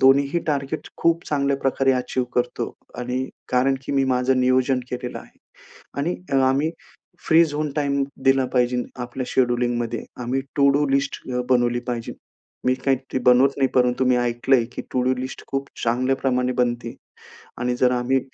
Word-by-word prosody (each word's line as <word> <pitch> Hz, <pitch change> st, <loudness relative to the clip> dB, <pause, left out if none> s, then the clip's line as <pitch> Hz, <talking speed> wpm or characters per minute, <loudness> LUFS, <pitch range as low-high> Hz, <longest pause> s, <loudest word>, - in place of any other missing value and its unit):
दोन्हीही 140 Hz, +4 st, +4 dB
टार्गेट 140 Hz, 0 st, -2 dB
खूप 170 Hz, 0 st, +2 dB
चांगल्या 140 Hz, -2 st, +1 dB
प्रकारे 135 Hz, 0 st, +2 dB
अचीव्ह 125 Hz, 0 st, -1 dB
करतो. 125 Hz, 0 st, -1 dB, 0.3 s
आणि 125 Hz, +1 st, -2 dB, 0.2 s
कारण 130 Hz, +2 st, +2 dB
की -, -, -3 dB
मी 135 Hz, -1 st, +2 dB
माझं 130 Hz, 0 st, +2 dB
नियोजन 130 Hz, 0 st, +2 dB
केलेलं 125 Hz, 0 st, -4 dB
आहे. -, -, -16 dB, 0.6 s
आणि 170 Hz, +5 st, -1 dB, 0.3 s
आम्ही 135 Hz, +4 st, +2 dB, 0.6 s
फ्री 165 Hz, +1 st, +6 dB
झोन 150 Hz, -1 st, -2 dB
टाईम 140 Hz, -2 st, +1 dB, 0.2 s
दिला 135 Hz, 0 st, +4 dB
पाहिजे 125 Hz, -1 st, +2 dB, 0.2 s
आपल्या 125 Hz, +1 st, -4 dB
शेड्यूलिंगमध्ये 120 Hz, -2 st, 0 dB, 0.2 s
आम्ही 130 Hz, +3 st, -1 dB, 0.2 s
टू 140 Hz, -1 st, +5 dB
डू 145 Hz, +1 st, +2 dB
लिस्ट 140 Hz, +1 st, 0 dB, 0.3 s
बनवली 120 Hz, -1 st, +3 dB
पाहिजे. 120 Hz, -2 st, -3 dB, 0.5 s
मी 130 Hz, -, +4 dB
काही 130 Hz, 0 st, -1 dB
बनवत 125 Hz, +2 st, +6 dB
नाही 135 Hz, -1 st, +3 dB
परंतु 125 Hz, 0 st, +3 dB
मी 125 Hz, -1 st, +4 dB
ऐकलंय, 120 Hz, +1 st, +2 dB
की -, -, -5 dB
टू 130 Hz, -, 0 dB
डू 130 Hz, +1 st, +2 dB
लिस्ट 130 Hz, +1 st, -6 dB
खूप 135 Hz, 0 st, -3 dB, 0.2 s
चांगल्या 130 Hz, +3 st, +1 dB
प्रमाणे 125 Hz, -1 st, 0 dB
बनते 120 Hz, -1 st, -1 dB, 0.6 s
आणि 125 Hz, 0 st, 0 dB
जर 125 Hz, 0 st, +3 dB
प -, -, 0 dB
आम्ही, 125 Hz, +2 st, +1 dB
130 Hz, 160 wpm, -23 LUFS, 125-135 Hz, 0.6 s, फ्री